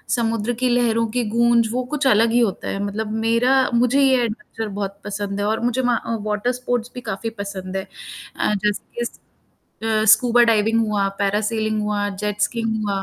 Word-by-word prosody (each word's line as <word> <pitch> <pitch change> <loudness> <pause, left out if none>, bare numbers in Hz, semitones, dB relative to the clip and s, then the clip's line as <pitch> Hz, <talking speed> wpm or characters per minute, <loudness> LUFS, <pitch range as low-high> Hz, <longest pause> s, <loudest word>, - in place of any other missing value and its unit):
समुद्र 230 -1 -1
की 255 0 +2
लहरों 235 -2 +2
की 245 +1 0
गूंज 235 0 +3
वो 250 +2 -1
कुछ 285 -2 +1
अलग 225 -1 +4
ही 240 - +3
होता 225 -5 0
है 195 - -3
मतलब 210 +2 -3
मेरा 230 +3 +3 0.2
मुझे 250 +3 +3
ये 265 -1 +5
एडवेंचर 225 -1 -5
बहुत 200 -1 -5
पसंद 205 -1 -4
है 205 - 0
और 220 +1 0
मुझे 245 +2 0
मा 245 -1 +2
वहाँ 230 - -2
वॉटर 210 +3 0
स्पोर्ट्स 245 -1 -2
भी 250 - -6
काफ़ी 200 +4 -3
पसंद 195 -1 -5
है 190 - -3 0.5
अ, - - 0
जैसे 210 +1 -1 0.2
कि 240 - 0
स - - -8 0.9
स्कूबा 240 +2 +5
डाइविंग 225 0 +2
हुआ, 205 -2 0
पैरासेलिंग 215 +2 0
हुआ 205 -1 -1
जेट 210 0 -3
स्कीइंग 225 -2 -1
हुआ। 200 -1 -1
225 Hz, 190 wpm, -21 LUFS, 205-240 Hz, 0.9 s, ये